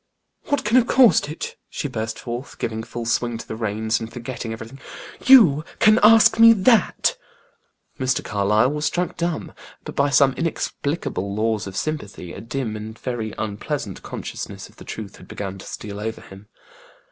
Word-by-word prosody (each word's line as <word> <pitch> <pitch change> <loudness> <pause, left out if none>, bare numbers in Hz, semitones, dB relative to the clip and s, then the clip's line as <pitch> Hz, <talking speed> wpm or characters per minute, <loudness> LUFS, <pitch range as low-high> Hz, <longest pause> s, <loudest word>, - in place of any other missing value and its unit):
"What 285 - -1
can 220 +4 +4
have 250 -1 +4
caused 235 - +5
it?" 155 - -6
she 145 - -3
burst 110 -3 -4
forth, 120 +2 -6
giving 110 -1 -3
full 115 +1 -6
swing 120 0 0
to - - -9
the - - -5
reins, 110 0 -1
and 115 0 -7
forgetting 120 -1 -6
everything. 115 +4 -8 0.5
"You 190 - +8
can 215 +1 +5
ask 225 +1 +6
me 230 0 +9
that?" 220 0 +3 0.8
Mr. 130 0 0
Carlyle 105 +5 +2
was 150 0 -3
struck 180 +2 -1
dumb; 170 -1 -3 0.3
but - - -8
by 140 +1 +2
some 140 -1 +4
inexplicable 140 - -3
laws 110 -1 0
of 95 - -7
sympathy, 105 - -4
a - - -8
dim 115 -1 -4
and 110 +1 -7
very 115 -4 -4
unpleasant 105 -1 -4
consciousness - - -7
of - - -23
the - - -12
truth 105 -3 -8
began 95 -1 -6
to - - -11
steal 100 -1 -7
over 110 +1 -4
him. 95 +2 -14
120 Hz, 170 wpm, -22 LUFS, 110-155 Hz, 0.8 s, me